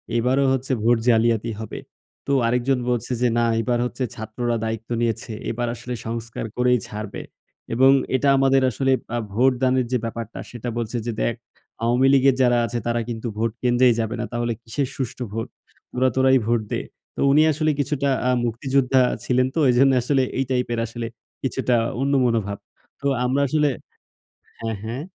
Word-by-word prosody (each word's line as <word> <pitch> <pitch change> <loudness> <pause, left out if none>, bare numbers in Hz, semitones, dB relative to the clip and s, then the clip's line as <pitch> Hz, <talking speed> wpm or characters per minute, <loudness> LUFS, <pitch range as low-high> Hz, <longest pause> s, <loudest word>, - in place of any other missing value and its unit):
এইবারও 130 +4 +2
হচ্ছে 130 +1 -2
ভোট 120 0 +4
জালিয়াতি 115 0 +2
হবে।" 110 - -6 0.5
তো - - 0 0.2
আরেকজন 125 +2 +1
বলছে 120 0 -1
যে, 125 - +4
"না 120 - +3
এইবার 120 +1 0
হচ্ছে 125 +1 -3
ছাত্ররা 115 +2 -3
দায়িত্ব 110 0 -4
নিয়েছে। 115 -1 -1 0.2
এবার 120 +1 -2
আসলে 120 +1 -6
সংস্কার 115 0 -4
করেই 125 -1 +3
ছাড়বে।" 105 -1 -6 0.5
এবং 130 +3 +6 0.2
এটা 140 +2 +2
আমাদের 135 0 +4
আসলে 135 +3 0 0.2
আ - - 0 0.2
ভোটদানের 130 +1 +2
যে 125 - +3
ব্যাপারটা 115 -1 -6
সেটা 120 0 -5
বলছে 120 +1 -2
যে, 120 - -1
"দেখ 120 - +1 0.5
আওয়ামী 125 +3 +3
লীগের 135 -1 +5
যারা 120 -1 +4
আছে 120 0 -2
তারা 120 0 0
কিন্তু 115 +1 -4
ভোট 115 0 0
কেন্দ্রেই 120 0 +4
যাবে 110 +1 -1
না। 120 - -2
তাহলে 120 0 -1
কিসের 125 +4 -2
সুষ্ঠু 130 -1 -4
ভোট? 115 0 -3 0.5
তোরা 130 +1 +2
তোরাই 130 0 +5
ভোট 120 -1 +2
দে।" - - -1 0.3
তো - - -9
উনি 150 +2 +5
আসলে 155 +1 +1
কিছুটা 140 0 0 0.2
আ - - +3 0.2
মুক্তিযোদ্ধা 130 +2 +2 0.2
ছিলেন 125 0 +2
তো। - - +1
এইজন্য 135 +2 +5
আসলে 135 +1 +2 0.2
এই 135 - +1
টাইপ 125 -1 +1
এর 115 - -1
আসলে 115 0 -5 0.4
কিছুটা 130 -2 0 0.3
অন্য 140 +1 +1
মনোভাব। 105 -4 0 0.4
তো 140 - 0 0.2
আমরা 135 +3 +1
আসলে 150 +1 +2 0.9
হ্যাঁ, 115 -2 -3
হ্যাঁ। 120 +6 -4
125 Hz, 170 wpm, -23 LUFS, 115-130 Hz, 0.9 s, এবং